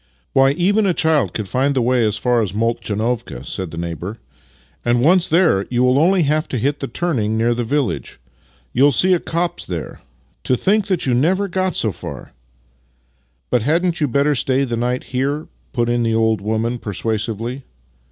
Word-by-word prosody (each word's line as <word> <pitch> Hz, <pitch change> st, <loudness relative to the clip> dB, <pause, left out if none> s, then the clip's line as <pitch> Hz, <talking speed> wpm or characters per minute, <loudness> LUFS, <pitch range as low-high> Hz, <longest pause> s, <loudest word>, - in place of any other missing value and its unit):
" -, -, -43 dB
Why, 135 Hz, +1 st, +4 dB
even 200 Hz, +6 st, +2 dB
a 180 Hz, -, +1 dB
child 150 Hz, -, +1 dB
could 105 Hz, -3 st, -3 dB
find 135 Hz, +6 st, 0 dB
tlie 130 Hz, -, +2 dB
way 125 Hz, 0 st, +2 dB
as 105 Hz, -1 st, 0 dB
far 120 Hz, +1 st, +1 dB
as 100 Hz, -5 st, -2 dB
Moltchanovka," 115 Hz, -, -2 dB
said 95 Hz, +2 st, -4 dB
the 80 Hz, -, -9 dB
neighbour; 85 Hz, +5 st, -5 dB, 0.3 s
" 65 Hz, +4 st, -34 dB
and, 120 Hz, 0 st, +2 dB
once 170 Hz, +7 st, +4 dB
there, 165 Hz, -, +3 dB
you 125 Hz, +1 st, +2 dB
only 165 Hz, +8 st, +3 dB
have 155 Hz, +1 st, +1 dB
to 130 Hz, -, -3 dB
hit 140 Hz, +5 st, -1 dB
the 135 Hz, -, -3 dB
turning 120 Hz, -13 st, -1 dB
near 115 Hz, +2 st, +2 dB
the 120 Hz, +1 st, -2 dB
village. 140 Hz, +3 st, -2 dB, 0.5 s
You 135 Hz, -, +4 dB
will 145 Hz, -, +5 dB
see 185 Hz, +8 st, +3 dB
a 175 Hz, -, +2 dB
copse 170 Hz, +2 st, -2 dB
there. 85 Hz, -3 st, -6 dB, 0.4 s
To 125 Hz, -, +2 dB
think 205 Hz, -, +1 dB
that 185 Hz, -4 st, 0 dB
you 130 Hz, -, +1 dB
never 180 Hz, +11 st, +2 dB
got 185 Hz, 0 st, -1 dB
so 110 Hz, -, +1 dB
far! -, -, -9 dB, 0.4 s
" -, -, -40 dB, 0.2 s
" -, -, -44 dB
But 125 Hz, -, +3 dB
hadn't 165 Hz, +6 st, +1 dB
you 150 Hz, -, +3 dB
better 140 Hz, +3 st, +2 dB
stay 135 Hz, 0 st, +1 dB
the 120 Hz, -3 st, -2 dB
night 125 Hz, +2 st, -1 dB
here? 140 Hz, +4 st, -2 dB
" -, -, -38 dB
put 120 Hz, -2 st, 0 dB
in 120 Hz, 0 st, +1 dB
the 115 Hz, -1 st, +1 dB
old 110 Hz, -2 st, +2 dB
woman, 110 Hz, +3 st, -1 dB
persuasively. 115 Hz, +4 st, -3 dB
125 Hz, 200 wpm, -19 LUFS, 110-150 Hz, 0.5 s, will